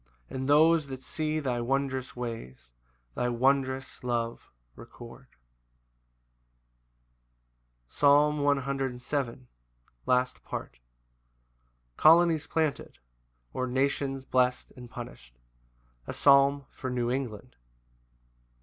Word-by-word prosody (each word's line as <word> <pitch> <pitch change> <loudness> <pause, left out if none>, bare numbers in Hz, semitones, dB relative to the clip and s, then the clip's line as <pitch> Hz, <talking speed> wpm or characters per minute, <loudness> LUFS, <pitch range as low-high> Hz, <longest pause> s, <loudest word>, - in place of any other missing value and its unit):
And 130 +1 -4
those 155 +1 +5
that 130 -1 -8
see 155 0 -2
thy 125 -5 -2
wondrous 130 +1 -2
ways, 65 - -7 0.4
Thy 125 - -1
wondrous 130 +2 0
love 120 -1 -3 0.3
record. 120 +2 -13 2.6
Psalm 145 - +3
107:6. 135 -2 -1 0.6
Last 125 0 +1
Part. - - -7 1.2
Colonies 165 -1 +5
planted; 160 -3 -2 0.6
or, 130 - -2
Nations 135 +1 -1
blest 125 -1 +1
and 125 -1 -11
punished. 115 - -10 0.7
A - - -4
psalm 140 0 +4
for 130 - -6
New 120 -1 -1
England. 120 - -4
130 Hz, 85 wpm, -28 LUFS, 125-140 Hz, 2.6 s, those